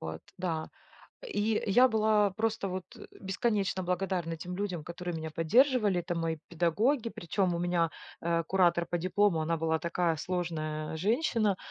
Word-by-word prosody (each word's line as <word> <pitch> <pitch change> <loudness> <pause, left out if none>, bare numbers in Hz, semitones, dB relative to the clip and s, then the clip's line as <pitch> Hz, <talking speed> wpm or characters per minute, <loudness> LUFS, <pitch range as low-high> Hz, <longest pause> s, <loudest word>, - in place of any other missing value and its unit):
Вот, 80 0 -5 0.2
да. 165 -4 -2 0.6
И 220 - 0
я 245 +6 +6
была 215 -2 +3
просто 220 -1 -1
вот, 185 0 -4
э, - - -11
бесконечно 195 -1 0
благодарна 180 -2 -1
тем 180 +3 -6
людям, 190 -5 -3
которые 175 0 -5
меня 160 0 -5
поддерживали. 210 - +3
Это 175 +1 -3
мои 165 -1 -1
педагоги, 215 - +1
причём 180 +1 -1
у - - -1
меня, 175 -2 +1 0.3
э, 170 0 +1
куратор 175 -1 +2
по 175 - -1
диплому, 185 -1 +2
она 165 +1 0
была 160 0 0
такая 170 -1 0
сложная 155 -3 -3
женщина, 215 - +1
180 Hz, 155 wpm, -30 LUFS, 165-205 Hz, 0.6 s, я